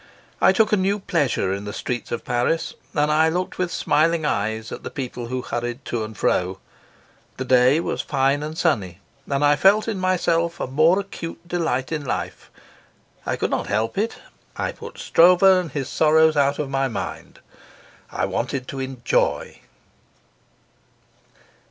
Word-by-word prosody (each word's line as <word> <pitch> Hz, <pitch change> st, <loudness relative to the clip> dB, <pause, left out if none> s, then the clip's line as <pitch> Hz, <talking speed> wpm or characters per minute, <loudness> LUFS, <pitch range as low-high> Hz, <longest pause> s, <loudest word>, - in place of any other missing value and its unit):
I -, -, +6 dB
took 220 Hz, -1 st, +2 dB
a 210 Hz, -, +4 dB
new 195 Hz, +2 st, +1 dB
pleasure 145 Hz, -, 0 dB
in 100 Hz, +1 st, -5 dB
the 105 Hz, -, -4 dB
streets 125 Hz, -1 st, -4 dB
of 120 Hz, -, -4 dB
Paris, 145 Hz, +7 st, 0 dB, 0.2 s
and 150 Hz, 0 st, +2 dB
I 160 Hz, +1 st, +4 dB
looked 180 Hz, +3 st, -3 dB
with 180 Hz, -1 st, -1 dB
smiling 155 Hz, +2 st, +1 dB
eyes 110 Hz, -2 st, -2 dB
at -, -, -6 dB
the -, -, -6 dB
people 125 Hz, -3 st, -5 dB
who 125 Hz, +1 st, -3 dB
hurried 120 Hz, +2 st, -4 dB
to 115 Hz, -2 st, -2 dB
and 110 Hz, -1 st, -8 dB
fro. 90 Hz, 0 st, 0 dB, 0.8 s
The 130 Hz, -, -3 dB
day 130 Hz, +3 st, +4 dB
was -, -, -2 dB
fine 135 Hz, 0 st, +1 dB
and 155 Hz, +1 st, -5 dB
sunny, 100 Hz, -, 0 dB, 0.3 s
and 140 Hz, +1 st, +1 dB
I 145 Hz, 0 st, +5 dB
felt 200 Hz, +8 st, +4 dB
in 215 Hz, -4 st, -2 dB
myself 170 Hz, -2 st, +1 dB
a -, -, -1 dB
more 155 Hz, +8 st, +3 dB
acute 175 Hz, -3 st, -7 dB
delight 160 Hz, -7 st, -1 dB
in 155 Hz, -2 st, -2 dB
life. 130 Hz, -, -4 dB, 0.8 s
I -, -, 0 dB
could -, -, -2 dB
not -, -, -1 dB
help 110 Hz, +2 st, -1 dB
it; 220 Hz, +4 st, -1 dB, 0.4 s
I -, -, -1 dB
put -, -, -11 dB
Stroeve 180 Hz, +2 st, +4 dB
and 185 Hz, -4 st, +5 dB
his 135 Hz, -2 st, -3 dB
sorrows 160 Hz, 0 st, +4 dB
out 140 Hz, 0 st, +2 dB
of 150 Hz, -, -2 dB
my 135 Hz, 0 st, 0 dB
mind. 110 Hz, -6 st, -6 dB, 0.7 s
I -, -, -1 dB
wanted 125 Hz, +2 st, -3 dB
to 135 Hz, -, -5 dB
enjoy. 130 Hz, -2 st, -1 dB
145 Hz, 165 wpm, -22 LUFS, 125-170 Hz, 0.8 s, I